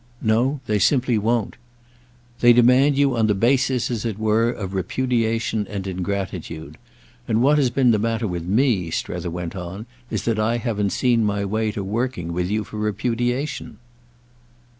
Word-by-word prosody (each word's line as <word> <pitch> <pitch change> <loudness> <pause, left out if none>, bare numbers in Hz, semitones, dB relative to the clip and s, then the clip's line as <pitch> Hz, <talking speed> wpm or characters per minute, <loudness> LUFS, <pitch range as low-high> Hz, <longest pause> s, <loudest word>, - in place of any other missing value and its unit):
"No, 125 +5 +1
they 105 -2 0
simply 125 +1 +2
won't." 115 +1 -1 0.8
"They 120 0 +7
demand 125 +4 +5
you 140 -2 +3
on 110 -2 +2
the 105 - +2
basis, 125 +2 +1
as 115 -3 -2
it 110 -4 -3
were, 110 +1 +2
of 100 -5 -5
repudiation 115 +1 -1
and 100 -2 -5
ingratitude; 90 -5 -5 0.5
and 115 +1 +2
what 150 +2 +4
has 135 -3 +3
been 125 0 +3
the 110 - +2
matter 115 +1 -1
with 90 -2 -3
me," 105 -4 +2
Strether 85 +1 -3
went 85 0 -5
on, 95 +4 -6 0.2
"is - - -3
that 115 -2 0
I 115 +2 +1
haven't 110 -4 -1
seen 120 +2 +2
my 100 -1 0
way 110 +2 -1
to 100 - -4
working 100 -4 -3
with 90 +1 -1
you 105 +1 0
for 105 - -9
repudiation." 120 +6 -2
110 Hz, 165 wpm, -22 LUFS, 100-120 Hz, 0.8 s, They